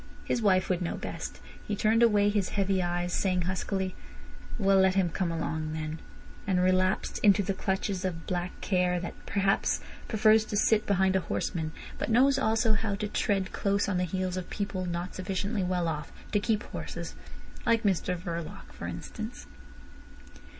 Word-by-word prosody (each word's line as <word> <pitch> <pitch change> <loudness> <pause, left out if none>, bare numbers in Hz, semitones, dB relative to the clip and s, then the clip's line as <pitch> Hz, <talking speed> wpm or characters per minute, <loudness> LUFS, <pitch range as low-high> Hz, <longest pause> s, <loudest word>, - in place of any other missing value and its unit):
His 240 - 0
wife 185 -3 +3
would 185 -1 0
know 175 - -1
best. - - -6 0.3
He 210 - -1
turned 220 +3 +3
away 205 -3 +5
his 205 -3 0
heavy 195 -1 +2
eyes, 175 0 -1
saying 185 -2 +1
huskily: 185 +1 -2 0.6
"Well, 195 -3 +4
let 190 0 +4
him 190 -3 +3
come 175 0 -1
along, 160 -1 -2
then," 155 0 -4 0.5
and 185 -2 +2
relapsed 185 +1 +2
into 200 -1 +5
the 195 - -1
clutches 190 0 -1
of 170 -3 -3
black 180 0 -3
care, 180 -2 +1
that 175 - -5
perhaps 195 -1 +2 0.3
prefers 220 0 +5
to 205 - -2
sit 215 +1 +3
behind 190 -1 +3
a - - +4
horseman, 160 -3 -2 0.3
but - - -2
knows 265 +4 +5
also 225 -2 +2
how 215 -1 0
to 210 +1 -2
tread 195 -3 0
close 200 0 +1
on 195 -2 0
the - - +1
heels 185 +1 -2
of 185 - -5
people 195 -3 -3
not 175 +1 -3
sufficiently 195 +3 -2
well 180 -2 0
off 150 -2 -3 0.2
to 205 - +3
keep 215 +1 0
horses—like 230 0 -4
Mr 185 -2 +1
Verloc, 170 -2 -6
for - - -6
instance. 220 +2 -6
190 Hz, 170 wpm, -29 LUFS, 180-205 Hz, 0.6 s, away